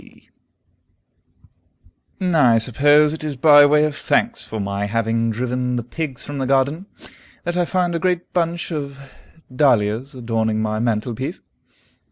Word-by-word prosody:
S.P." -, -, -21 dB, 1.9 s
I 155 Hz, -11 st, +3 dB
suppose 145 Hz, +6 st, +3 dB
it 160 Hz, -, -7 dB
is 150 Hz, -2 st, -4 dB
by 145 Hz, +1 st, +7 dB
way 150 Hz, +1 st, +3 dB
of 150 Hz, -1 st, -3 dB
thanks -, -, 0 dB
for 110 Hz, -, -6 dB
my 100 Hz, 0 st, -2 dB
having 115 Hz, +1 st, 0 dB
driven 125 Hz, +2 st, -2 dB
the 120 Hz, -, -2 dB
pigs 135 Hz, +1 st, -5 dB
from 145 Hz, -1 st, -6 dB
the 130 Hz, -, -2 dB
garden, 140 Hz, +7 st, 0 dB, 0.6 s
that 175 Hz, 0 st, -3 dB
I 175 Hz, -1 st, +1 dB
find 180 Hz, -1 st, -1 dB
a 170 Hz, -, -1 dB
great 180 Hz, 0 st, -2 dB
bunch 170 Hz, 0 st, -1 dB
of 140 Hz, -3 st, -5 dB, 0.6 s
dahlias 125 Hz, -1 st, +1 dB
adorning 115 Hz, -3 st, -1 dB
my 110 Hz, 0 st, -2 dB
mantelpiece. 120 Hz, -, -3 dB
135 Hz, 145 wpm, -20 LUFS, 115-155 Hz, 1.9 s, by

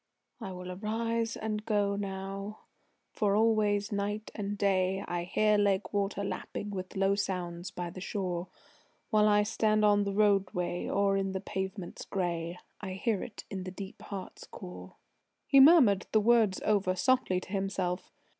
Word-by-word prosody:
"I 190 Hz, -, -6 dB
will 180 Hz, 0 st, -7 dB
arise 225 Hz, +3 st, -1 dB
and 215 Hz, -1 st, -3 dB
go 205 Hz, -2 st, +1 dB
now, 195 Hz, +1 st, -5 dB, 0.5 s
for 205 Hz, -2 st, +1 dB
always 210 Hz, -2 st, +2 dB
night 205 Hz, +1 st, -2 dB
and 205 Hz, -1 st, -4 dB
day 190 Hz, -1 st, +1 dB
I 175 Hz, 0 st, -2 dB
hear 210 Hz, +3 st, +3 dB
lake 200 Hz, 0 st, +1 dB
water 200 Hz, 0 st, -1 dB
lapping 205 Hz, +1 st, -4 dB
with 185 Hz, -2 st, -6 dB
low 195 Hz, 0 st, +3 dB
sounds 180 Hz, -3 st, -3 dB
by 175 Hz, -2 st, -5 dB
the 185 Hz, -, -9 dB
shore; 185 Hz, -3 st, -3 dB, 0.6 s
While 215 Hz, 0 st, +5 dB
I 210 Hz, 0 st, +4 dB
stand 215 Hz, 0 st, +2 dB
on 205 Hz, -1 st, +4 dB
the 200 Hz, -, -2 dB
roadway, 195 Hz, -4 st, +1 dB
or 195 Hz, 0 st, +2 dB
on 195 Hz, 0 st, -2 dB
the 190 Hz, -, -2 dB
pavements 190 Hz, -1 st, -5 dB
gray, 175 Hz, -2 st, -2 dB, 0.2 s
I 190 Hz, -2 st, -5 dB
hear 200 Hz, +1 st, -1 dB
it 215 Hz, -, -8 dB
in 190 Hz, -2 st, -4 dB
the 185 Hz, -, -5 dB
deep 190 Hz, +1 st, -8 dB
heart's 195 Hz, -2 st, -8 dB
core." 180 Hz, -2 st, -10 dB, 0.5 s
He 275 Hz, -, +5 dB
murmured 265 Hz, -, +7 dB
the 215 Hz, -, +6 dB
words 220 Hz, -3 st, +3 dB
over 195 Hz, -3 st, +2 dB
softly 185 Hz, -1 st, +2 dB
to 185 Hz, -, -12 dB
himself. 195 Hz, -2 st, -2 dB
200 Hz, 160 wpm, -30 LUFS, 185-210 Hz, 0.6 s, murmured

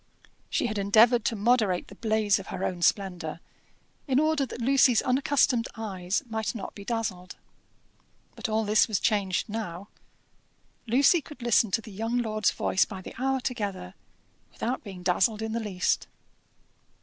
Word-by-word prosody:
She -, -, 0 dB
had 215 Hz, -3 st, -2 dB
endeavoured 220 Hz, +4 st, +5 dB
to 230 Hz, -, 0 dB
moderate 210 Hz, -4 st, +1 dB
the -, -, -12 dB
blaze 215 Hz, -1 st, +1 dB
of 195 Hz, -, -10 dB
her 190 Hz, -, -5 dB
own 180 Hz, -1 st, -3 dB
splendour, 175 Hz, -4 st, 0 dB, 0.7 s
in 265 Hz, -1 st, +3 dB
order 310 Hz, -3 st, +1 dB
that -, -, -8 dB
Lucy's 255 Hz, -1 st, +4 dB
unaccustomed 255 Hz, -2 st, +2 dB
eyes 195 Hz, -1 st, -3 dB
might 220 Hz, -1 st, -3 dB
not 205 Hz, -, -6 dB
be 200 Hz, -, -10 dB
dazzled. 200 Hz, -5 st, -4 dB, 1.0 s
But -, -, -4 dB
all 220 Hz, 0 st, 0 dB
this 210 Hz, +1 st, +4 dB
was 215 Hz, -4 st, 0 dB
changed 200 Hz, -3 st, 0 dB
now. 205 Hz, -4 st, -5 dB, 1.0 s
Lucy 275 Hz, +8 st, +4 dB
could 290 Hz, -3 st, -12 dB
listen 235 Hz, -2 st, +3 dB
to 210 Hz, -, 0 dB
the 215 Hz, -, -11 dB
young 225 Hz, +5 st, -2 dB
lord's 215 Hz, -3 st, +1 dB
voice 190 Hz, -, +1 dB
by 190 Hz, -3 st, -7 dB
the -, -, -9 dB
hour 265 Hz, 0 st, +1 dB
together 200 Hz, -7 st, -4 dB, 0.6 s
without 245 Hz, +3 st, -3 dB
being 190 Hz, -4 st, -9 dB
dazzled 210 Hz, +5 st, +1 dB
in 220 Hz, -, -3 dB
the 230 Hz, -, -1 dB
least. 200 Hz, -5 st, -1 dB
220 Hz, 160 wpm, -27 LUFS, 195-240 Hz, 1.0 s, endeavoured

